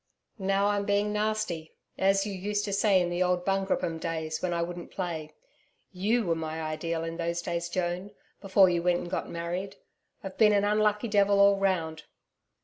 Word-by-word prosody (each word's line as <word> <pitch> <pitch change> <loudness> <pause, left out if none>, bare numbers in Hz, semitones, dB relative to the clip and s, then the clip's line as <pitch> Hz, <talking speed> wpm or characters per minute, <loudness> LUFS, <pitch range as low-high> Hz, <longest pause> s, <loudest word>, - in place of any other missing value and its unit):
Now 195 +1 +1
I'm 205 0 +1
being 205 +1 +1
nasty, 210 -7 -2 0.2
as 195 +1 +2
you 205 - -4
used 205 +2 -2
to 200 - -3
say 200 -1 +4
in 175 -1 0
the 175 +1 -1
old 180 -1 +1
Bungroopim 190 -4 0
days 160 -1 -3
when 180 - -1
I 170 0 0
wouldn't 175 0 -6
play. 165 -5 -4 0.6
YOU 210 +5 +1
were 170 - +2
my 160 0 -4
Ideal, 160 +1 -3
in 165 0 -5
those 170 0 -2
days, 170 0 -3
Joan 180 +2 -2 0.3
before 195 -1 +5
you 175 -1 +1
went 175 0 +2
and 175 - -7
got - - -3
married. 175 +4 -4 0.5
I've 195 -1 -8
been 210 -2 +6
an 200 0 +3
unlucky 210 +1 +2
devil 200 -1 +3
all 200 0 +6
round. 165 -5 -1
185 Hz, 185 wpm, -28 LUFS, 170-200 Hz, 0.6 s, been